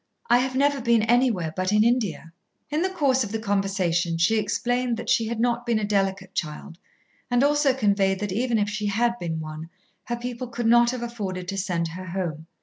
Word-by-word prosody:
"I 240 - +6
have 260 0 -1
never 280 0 +2
been 235 -2 +3
anywhere 225 -9 +2
but 185 +1 -1
in 210 0 +4
India." 220 -8 0 0.4
In 305 +2 0
the 375 - +1
course 275 -8 +2
of 205 - -6
the 225 - -1
conversation 195 -5 0
she 215 +7 +3
explained 245 +3 -1
that 235 - -3
she 225 - +2
had 230 0 -3
not 240 0 +1
been 235 -2 +1
a 215 - -2
delicate 195 -2 -1
child, 165 +1 -5 0.5
and 245 +1 +3
also 290 -1 +3
conveyed 200 -6 +1
that 205 -2 -2
even 235 +3 0
if 205 -1 +1
she 210 0 -3
had 235 +4 +1
been 165 -2 -3
one, 155 +1 -7 0.4
her 240 - -2
people 245 +1 -5
could 240 0 -4
not 240 +1 +5
have 245 -1 -3
afforded 195 -6 -5
to 195 - -3
send 175 -4 -1
her 185 +3 -8
home. 170 -4 -4
215 Hz, 210 wpm, -25 LUFS, 185-240 Hz, 0.5 s, I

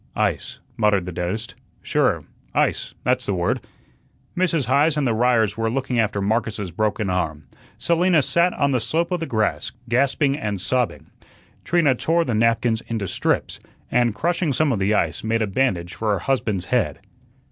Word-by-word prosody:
"Ice," - - -1 0.2
muttered 105 -4 +2
the 90 - -5
dentist, 90 +7 -3 0.3
"sure, - - +1 0.3
ice, - - 0
that's 125 +1 +1
the 100 - 0
word." 85 -1 0 0.7
Mrs. 170 -6 +1
Heise 145 +5 +3
and 145 -3 +1
the 115 - +2
Ryers 115 -2 +2
were 115 0 0
looking 130 0 -1
after 105 -2 +1
Marcus's 105 -2 -1
broken 105 +3 -1
arm. 80 -5 -2 0.3
Selina 170 +4 +3
sat 170 +6 +2
on 140 -1 +1
the 130 - +2
slope 170 +8 -1
of 180 - 0
the 165 - -3
grass, 110 -2 -1 0.2
gasping 135 +3 +2
and 105 -8 -3
sobbing. 125 +5 -1 0.5
Trina 165 -6 +3
tore 165 +6 +1
the 120 - -1
napkins 115 +1 +2
into 110 -4 -2
strips, - - -1 0.3
and, 120 -3 +2
crushing 170 - 0
some 155 +2 +2
of 110 - 0
the 100 +2 +2
ice, 80 -5 0
made 110 0 +1
a - - +2
bandage 95 -5 0
for 110 -2 0
her 100 - -1
husband's 110 -7 -1
head.' 125 -3 0
115 Hz, 170 wpm, -22 LUFS, 105-140 Hz, 0.7 s, Heise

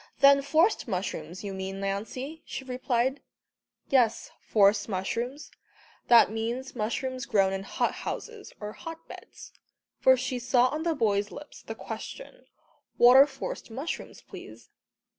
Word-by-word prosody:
"Than 275 0 +7
forced 320 +8 +2
mushrooms, 180 -3 -4
you 200 -1 -5
mean, 190 0 -5
Lancey," 225 +10 -4
she - - -6
replied. 255 +1 -1 0.7
"Yes, 240 -4 +2
forced 205 0 +3
mushrooms, 235 +9 -3 0.6
that 235 -3 +7
means 235 +5 -4
mushrooms 245 +3 -3
grown 195 -5 +2
in 195 - -3
hot 195 - -1
houses, 450 -3 -6
or 210 0 -6
hot 330 +4 -9
beds;" - - -12 0.5
for 260 0 +6
she 255 0 -3
saw 245 +1 +3
on 305 +3 -3
the 330 -1 0
boys' 205 -5 +1
lips 295 +6 -11
the - - -7
question, - - -8 0.5
"what 245 +1 +7
are 275 +2 +9
forced 275 - -7
mushrooms, 270 +9 -6
please?" - - -12
245 Hz, 140 wpm, -28 LUFS, 205-275 Hz, 0.7 s, are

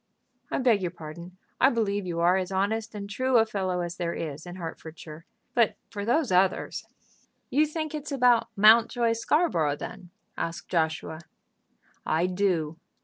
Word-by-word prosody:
"I - - -1
beg 240 -6 +3
your 180 - -1
pardon. 170 +3 -10 0.2
I 270 - +6
believe 205 -5 -1
you 170 -1 -2
are 175 +2 +4
as 185 0 -1
honest 215 +3 -1
and 200 -1 -5
true 255 +5 +1
a 225 - +5
fellow 190 -4 -2
as 175 0 -5
there 170 -1 -2
is 155 +1 -5
in 175 - -7
Hertfordshire, 165 -2 -9 0.3
but 235 -3 +3 0.2
for 205 -1 -4
those 255 +2 +1
others 185 +1 +1 0.3
" - - -40
"You 300 +4 +3
think 310 0 -4
it's 300 -1 -5
about 250 -4 +4
Mountjoy 230 +3 +5
Scarborough, 230 - +1
then?" 180 +4 -8 0.3
asked 165 0 -4
Joshua. 160 -1 -1 0.8
"I 160 +3 +1
do. 180 -4 0
195 Hz, 160 wpm, -27 LUFS, 170-230 Hz, 0.8 s, I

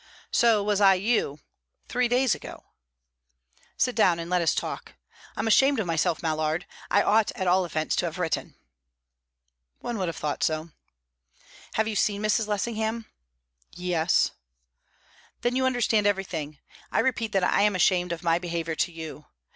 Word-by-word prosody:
"So 225 -3 +4
was 205 0 0
I 195 -1 +7
you 185 - 0 0.5
three 250 0 +1
days 250 -2 +2
ago." - - -9 1.1
"Sit 250 - +1
down, 180 -6 +4
and 170 +1 -6
let 180 -1 +2
us 165 - +2
talk. - - -5 0.4
I'm - - -1
ashamed 270 +4 +4
of 215 - -1
myself, 165 -1 0
Mallard. 155 +1 -1 0.2
I 205 - +4
ought 215 0 +3
at 190 -6 -3
all 185 +1 +3
events 155 -2 -2
to - - +1
have 165 - -6
written." 165 -4 -2 1.2
"One 235 -3 -5
would 185 - -1
have 165 - -3
thought 150 0 -3
so." 155 +1 -1 1.0
"Have 220 0 +1
you 220 - -3
seen 205 +1 0
Mrs. 215 +1 +1
Lessingham?" 220 +2 -2 0.7
"Yes." 175 -2 +1 1.1
"Then 245 +1 0
you 260 0 +2
understand 230 -4 +2
everything. 170 -7 -2 0.3
I - - +1
repeat 230 -4 0
that 195 -2 +2
I 180 - +3
am 205 -1 +3
ashamed 180 -1 +2
of 170 +1 -5
my 165 0 +2
behaviour 170 -2 -3
to 165 - -1
you. 160 -2 -9
190 Hz, 160 wpm, -26 LUFS, 165-220 Hz, 1.2 s, I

